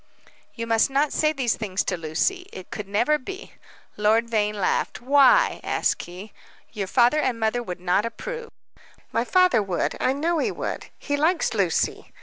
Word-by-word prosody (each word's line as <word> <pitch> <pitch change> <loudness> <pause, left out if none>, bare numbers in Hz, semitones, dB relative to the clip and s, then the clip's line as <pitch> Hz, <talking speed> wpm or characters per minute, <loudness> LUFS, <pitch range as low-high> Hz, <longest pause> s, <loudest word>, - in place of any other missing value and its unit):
"You 230 - -4
must 225 +1 +2
not 280 +2 +1
say 305 0 +2
these 260 -6 0
things 200 -4 -2
to 180 - -1
Lucy. 175 - -1
It 185 - -10
could 210 -2 -6
never 240 +10 +2
be." 385 - -8 0.5
Lord 220 +3 +2
Vane 210 -1 +1
laughed. 185 - 0
"Why?" 285 - +4
asked - - 0
he. 185 +4 -10 0.4
"Your 200 -4 -3
father 245 +7 +3
and 250 -6 -1
mother 220 +2 0
would 180 -6 -6
not 180 +3 +1
approve." 470 - -6 0.6
"My 230 - +1
father 365 - +3
would 185 -4 -2
I 260 - +2
know 325 +4 0
he - - +1
would. - - -5
He 285 -1 -2
likes 320 +1 +1
Lucy. 190 -6 -1
230 Hz, 170 wpm, -24 LUFS, 205-300 Hz, 0.6 s, Why